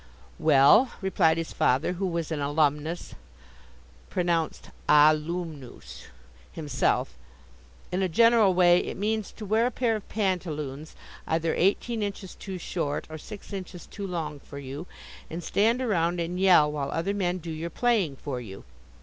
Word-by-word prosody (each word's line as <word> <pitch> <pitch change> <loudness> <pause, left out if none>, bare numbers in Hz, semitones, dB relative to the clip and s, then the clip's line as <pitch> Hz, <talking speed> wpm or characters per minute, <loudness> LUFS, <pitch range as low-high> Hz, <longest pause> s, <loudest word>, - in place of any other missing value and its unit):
"Well," 155 - +5
replied 175 -4 +2
his 165 0 -4
father, 135 +8 +2
who 190 +2 -2
was 170 -2 -3
an 150 -2 -2
alumnus 150 +3 0 1.0
(pronounced 170 -3 -1 0.2
ahloomnoose) 155 -1 +1 0.5
himself, 150 -3 -1 0.8
"in 180 +2 0
a 190 - +1
general 225 0 +5
way 175 -1 +6
it - - -5
means 215 +1 -1
to 215 - -8
wear 220 +4 +2
a - - +1
pair 235 -2 0
of 215 - -7
pantaloons 160 -8 -3 0.3
either 160 0 0
eighteen 220 +5 +1
inches 200 -2 -4
too 190 -2 -7
short 155 -4 -3
or 155 - -6
six 205 +4 -10
inches 185 -2 -7
too 200 -2 -7
long 160 -5 -4
for 140 - -11
you, 140 +5 -7 0.4
and 170 +2 -6
stand 230 +8 +2
around 175 -6 +1
and 175 +2 -3
yell 175 -6 +5
while 145 -2 -3
other 180 +5 -1
men 185 -3 -1
do 170 -2 -7
your 160 +2 -4
playing 205 - +1
for 130 -2 -5
you. 95 -4 -10
175 Hz, 150 wpm, -27 LUFS, 155-195 Hz, 1.0 s, way